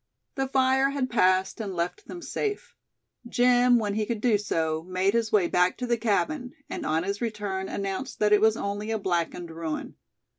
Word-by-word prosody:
The 270 -2 -1
fire 265 0 +3
had 275 -2 -2
passed, 190 -2 +2
and 195 -4 -4
left 175 +1 -3
them 345 -1 -8
safe. 420 -1 -4 0.5
Jim, 245 0 +4
when 210 -3 -1
he 215 0 -1
could 235 -3 -2
do 220 -2 +2
so, 160 -5 -1
made 185 +3 0
his 230 -2 0
way 195 -5 +3
back 180 +1 +2
to 250 - -3
the 240 -1 +2
cabin; 245 +4 -1 0.2
and - - -4
on 160 +1 +1
his 200 +3 -3
return 205 -4 -3
announced 195 +6 -4
that 210 0 +3
it 210 - +5
was 220 0 +4
only 205 +2 -3
a 225 - 0
blackened 175 -3 -2
ruin. 160 -1 -5
210 Hz, 190 wpm, -26 LUFS, 185-245 Hz, 0.5 s, it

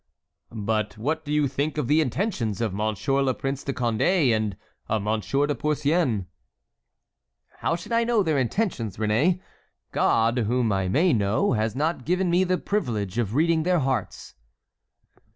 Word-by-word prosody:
"But 110 -1 -2
what 155 +8 -2
do 145 - -5
you 150 -1 +2
think 140 +4 -2
of 150 - -1
the 150 +3 +4
intentions 130 - -1
of 110 -5 -1
Monsieur 110 +6 0
le 130 -2 +1
Prince 135 0 -3
de 140 - -2
Condé 125 - +2
and 105 -3 -2 0.3
of 110 -2 0
Monsieur 110 +7 0
de 145 - 0
Porcian?" 150 - 0 1.3
"How 165 - 0
should 170 +6 -9
I 230 0 +3
know 230 -3 +2
their 155 -5 +1
intentions, 130 - -1
Réné? 115 - +1 0.5
God, 115 +2 +2
whom 120 0 +1
I 95 -1 0
may 155 - +3
know, 105 +2 +1
has 110 0 -1
not 150 -1 -1
given 180 +3 +1
me 180 +2 +4
the 185 0 +1
privilege 115 - -2
of 110 -1 -1
reading 160 +2 +3
their 180 +2 +2
hearts." 130 - -2
135 Hz, 160 wpm, -25 LUFS, 110-160 Hz, 1.3 s, the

